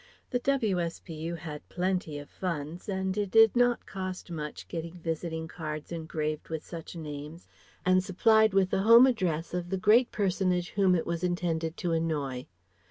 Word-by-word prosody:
The 245 - +1
W.S.P.U. 175 - -1
had 155 -3 -8
plenty 180 -4 -1
of 145 0 -8
funds 170 0 -5
and 190 -1 -1
it 205 -2 -1
did 225 +2 +6
not 245 0 +3
cost 185 -2 -6
much 150 -2 -6
getting 165 0 -5
visiting 160 -1 -3
cards 155 -2 -6
engraved 155 -2 -3
with 160 -1 -4
such 170 0 -8
names 150 +1 -7 0.4
and 185 0 +4
supplied 220 +3 +4
with 190 -1 +3
the 190 - +2
home 230 +4 +8
address 175 -11 0
of 175 -1 -3
the 190 - -1
great 220 +6 +4
personage 185 -3 0
whom 190 -2 +3
it 165 - 0
was 170 +1 -3
intended 170 -2 -1
to 175 - -2
annoy. 150 -6 -1
175 Hz, 165 wpm, -29 LUFS, 160-190 Hz, 0.4 s, home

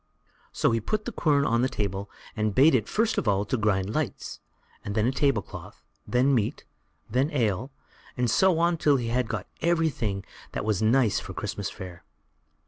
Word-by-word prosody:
So - - +1
he 115 - +1
put 215 - -2
the 240 - -3
quern 145 -8 +2
on 115 +1 +2
the 130 - +2
table, 100 -2 -3 0.3
and 110 -2 -1
bade 140 +4 +6
it 110 -5 +2
first 225 +1 +1
of - - -4
all 100 0 +2
grind 105 -3 0
lights, - - -3 0.4
then 105 +2 0
a 125 - +2
table 135 -6 +1
cloth, - - -11 0.2
then 130 +3 +3
meat, 110 -5 -1 0.4
then 130 +6 +1
ale, 115 -2 0 0.5
and 125 0 +1
so 185 - +3
on 170 0 +2
till 145 -3 +3
they 120 - -3
had 125 -1 +1
got 110 -4 -4 0.2
everything 155 -12 0 0.3
that - - -3
was 110 -3 0
nice 115 0 +3
for - - -9
Christmas - - -3
fare. 90 -2 -9
120 Hz, 180 wpm, -26 LUFS, 105-140 Hz, 0.5 s, bade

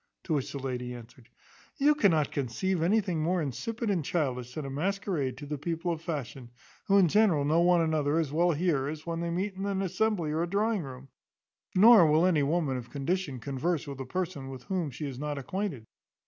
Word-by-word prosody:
To 165 - -2
which 140 -4 -1
the - - -5
lady 125 -2 -4
answered, 120 0 -14 0.5
"You 290 +2 +5
cannot 170 - +2
conceive 160 +7 -1
anything 185 -2 +1
more 175 +3 +1
insipid 220 - -3
and 175 -5 0
childish 125 -6 -2
than 155 - -4
a - - -4
masquerade 170 -3 -2
to 145 - -8
the 145 0 -4
people 165 +3 -2
of 160 -2 -4
fashion, 135 -7 -5 0.4
who 200 - +4
in 190 -3 +6
general 175 -6 +3
know 160 +3 +3
one 175 0 +4
another 155 -2 +1
as 155 -4 -1
well 175 +2 +3
here 150 -4 0
as 155 +1 -6
when 165 -1 -3
they 170 0 -2
meet 190 +4 -2
in 195 +1 -4
an 195 -1 -1
assembly 185 -3 0
or 155 +2 0
a 170 - -1
drawing 210 +1 +1
room; 135 -2 -9 0.7
nor 210 -2 +8
will 155 +3 +4
any 170 -5 +3
woman 145 -2 0
of 120 -1 -8
condition 145 0 -2
converse 140 +6 -2
with 140 -2 -7
a 135 - -4
person 165 -4 -3
with 130 -2 -8
whom 180 -3 -2
she 140 +3 -6
is 135 -3 -6
not 150 0 -3
acquainted. 145 - -4
160 Hz, 210 wpm, -29 LUFS, 140-185 Hz, 0.7 s, nor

